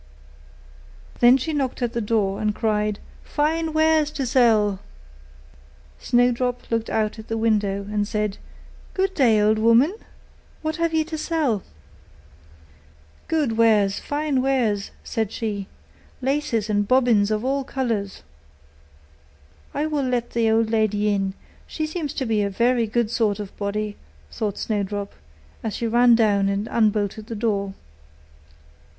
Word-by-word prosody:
Then 245 +2 +7
she 310 +5 -3
knocked 265 -3 -2
at 240 -1 -1
the 235 - -1
door, 205 -3 0
and 210 -1 0
cried, 210 -2 0 0.3
'Fine 320 +2 0
wares 315 -1 +3
to 280 -3 -3
sell!' 220 -6 +3 1.2
Snowdrop 245 0 +1
looked 230 0 -1
out 220 0 -1
at 220 - -10
the 225 - -2
window, 210 -3 +1
and 205 0 -1
said, 210 -2 -2 0.6
'Good 385 0 0
day, 240 - +4
good 215 +1 +3
woman! 230 - +4 0.7
what 315 +1 -2
have 335 -1 0
you 315 - +3
to 315 -1 -5
sell?' 300 - 0 1.7
'Good 290 -9 0
wares, 210 -4 +4
fine 290 -2 -1
wares,' 235 -7 0
said 220 -2 -2
she; 205 -5 -4 0.5
'laces 260 -5 -1
and 205 -1 0
bobbins 240 -5 +3
of 215 +2 -1
all 275 +1 0
colours.' 230 -7 -3 1.5
'I 295 - 0
will 305 -2 -1
let 245 -2 -1
the 230 -1 +1
old 220 0 +2
lady 210 -2 +1
in; 195 -1 -1 0.3
she 310 - -3
seems 310 -2 -4
to 265 - -2
be 220 -3 +1
a 200 - 0
very 235 +3 +1
good 230 0 0
sort 215 -3 +1
of 205 -2 -7
body,' 205 +1 -3 0.3
thought 210 -3 -3
Snowdrop, 205 -1 -3 0.5
as 220 - -3
she 235 - -3
ran 240 +1 +5
down 205 -3 +3
and 200 +2 -2
unbolted 215 -1 0
the 230 - -5
door. 200 -3 -1
225 Hz, 140 wpm, -23 LUFS, 210-260 Hz, 1.7 s, Then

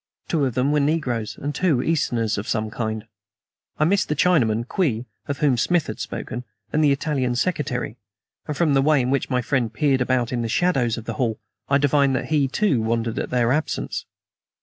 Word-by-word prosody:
Two 155 -4 +1
of 125 - -5
them 130 +3 +2
were 150 - +3
negroes, 140 -7 -1
and 145 +1 -3
two 155 -6 +1
Easterns 115 -9 0
of 105 - -6
some 110 -1 -1
kind. 110 -1 -3 0.7
I - - +2
missed 195 +4 +2
the 150 - +1
Chinaman, 120 -9 +2
Kwee, 125 - 0 0.2
of 140 - -2
whom 140 -5 +2
Smith 175 +6 +2
had - - -6
spoken, 120 +2 -5 0.3
and 155 - +3
the 145 - +5
Italian 135 -3 0
secretary; 130 -6 -1 0.5
and 150 -2 -3
from 160 -4 +3
the 135 - +4
way 150 +1 +4
in 125 0 0
which 140 - 0
my 125 -2 0
friend 125 -3 0
peered 140 -4 +1
about 125 -1 +1
the 120 -2 -1
shadows 125 -6 +1
of 115 - -7
the 115 - -3
hall 115 -3 0 0.3
I 140 - +5
divined 140 -1 +3
that - - -3
he, 150 -3 +2
too, 135 - +1
wondered 115 +1 -1
at - - -3
their 120 -1 +2
absence. 155 +3 -2
130 Hz, 200 wpm, -23 LUFS, 120-150 Hz, 0.7 s, the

